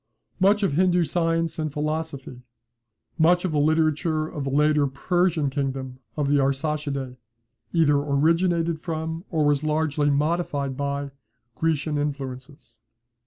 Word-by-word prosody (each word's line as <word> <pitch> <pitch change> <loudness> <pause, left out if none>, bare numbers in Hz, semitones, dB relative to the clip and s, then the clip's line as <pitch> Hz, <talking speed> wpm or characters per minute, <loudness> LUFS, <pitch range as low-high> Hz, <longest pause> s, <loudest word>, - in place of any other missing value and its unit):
Much 205 +2 +4
of 195 - +2
Hindoo 180 +3 +3
science 165 +1 0
and 155 -1 -2
philosophy, 150 -4 -4 0.8
much 175 +3 +4
of 180 - -1
the 150 - +1
literature 155 +1 +1
of 145 -3 -5
the - - -1
later 150 +1 +3
Persian 165 +1 0
kingdom 135 -2 -3 0.2
of 145 -2 0
the 145 0 +3
Arsacidae, 140 -1 -1 0.5
either 155 -4 +3
originated 165 +3 +1
from, 160 +1 -4
or 155 -3 +1
was 145 0 +2
largely 150 -1 +1
modified 145 -2 0
by, 140 0 -3 0.4
Grecian 155 +1 -1
influences. 135 -3 -6
150 Hz, 125 wpm, -24 LUFS, 140-165 Hz, 0.8 s, Much